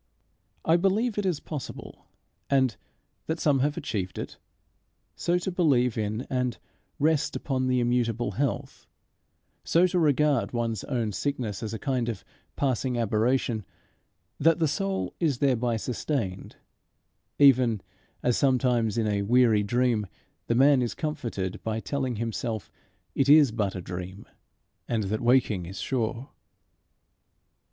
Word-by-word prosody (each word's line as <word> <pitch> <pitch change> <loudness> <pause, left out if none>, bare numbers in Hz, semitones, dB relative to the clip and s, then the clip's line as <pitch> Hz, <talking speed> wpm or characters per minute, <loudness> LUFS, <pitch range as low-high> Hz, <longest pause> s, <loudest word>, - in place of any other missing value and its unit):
I 165 +1 +5
believe 205 +5 +1
it 200 - 0
is 170 -6 0
possible 150 -5 -8 0.4
and 130 -4 +2 0.5
that 160 +1 -2
some 145 -3 +3
have 145 +4 0
achieved 100 - -3
it - - -6 0.8
so 175 +1 +1
to 180 +1 -3
believe 135 -9 +2
in 110 +1 -2
and 125 -2 -1 0.4
rest 155 0 +1
upon 130 -2 -1
the 125 0 +2
immutable 120 -2 0
Health 135 +6 -3 0.8
so 170 +2 +4
to 180 0 +1
regard 150 -4 +2
one's 115 -3 -2
own 120 -6 -1
sickness 120 -3 -3
as 110 -2 -4
a 115 - -3
kind 125 -1 -1
of 105 -5 -6 0.3
passing 130 -2 0
aberration, 115 +1 +1 0.8
that 165 +2 +4
the 165 -2 +2
soul 195 +5 -2
is 155 -7 +1
thereby 125 -4 +1
sustained, 115 -4 -3 0.8
even 130 -6 +5 0.4
as 125 -1 +2
sometimes 125 -5 +2
in 115 - +1
a 105 -1 0
weary 115 0 +4
dream 115 0 +1 0.4
the 115 - +1
man 135 +1 +5
is 120 - -2
comforted 120 - -4
by 110 0 -2
telling 130 0 -2
himself 115 -1 -3 0.4
it 135 0 +1
is 145 -4 +7
but 105 -3 -1
a 95 - -4
dream, 90 +3 -7 0.6
and 115 -3 0
that 105 +2 -2
waking 120 -7 +2
is 95 - -8
sure. 125 +1 -2
125 Hz, 135 wpm, -27 LUFS, 110-145 Hz, 0.8 s, is